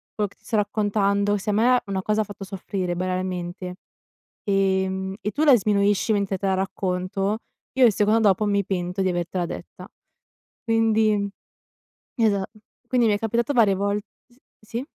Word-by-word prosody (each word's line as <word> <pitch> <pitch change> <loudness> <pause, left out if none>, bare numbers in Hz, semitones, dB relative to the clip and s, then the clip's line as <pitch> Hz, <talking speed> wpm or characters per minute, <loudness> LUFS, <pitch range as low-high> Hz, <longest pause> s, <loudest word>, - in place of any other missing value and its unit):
quello 210 -1 0
che - - -24
ti - - -36
sto 225 - -2
raccontando, 205 -1 +1
se 210 +2 -2
a - - 0
me 245 +4 +4
una 195 -1 -2
cosa 215 +2 +1
ha - - +1
fatto 205 -1 -9
soffrire 190 -2 -4
banalmente, 180 0 -3 0.7
ehm, 190 -1 0
e 210 - -2
tu 300 - -1
la 275 -5 +7
sminuisci 205 +1 +2
mentre 200 -2 0
te 195 - -3
la 190 - +2
racconto, 190 +2 -1 0.3
io 260 0 +4
il 220 - +5
secondo 210 +3 +2
dopo 210 0 +3
mi 200 -1 +1
pento 180 0 -2
di 190 - +1
avertela 175 0 -2
detta, - - -9 0.8
quindi 220 -2 +2 0.9
esa 205 -4 +2 0.4
quindi 245 -2 +3
mi 210 - +3
è - - -1
capitato 235 +4 0
varie 215 -6 +4
vol 200 +1 0 0.3
s 240 - -26 0.2
sì 230 +4 -5
200 Hz, 170 wpm, -24 LUFS, 190-215 Hz, 0.9 s, la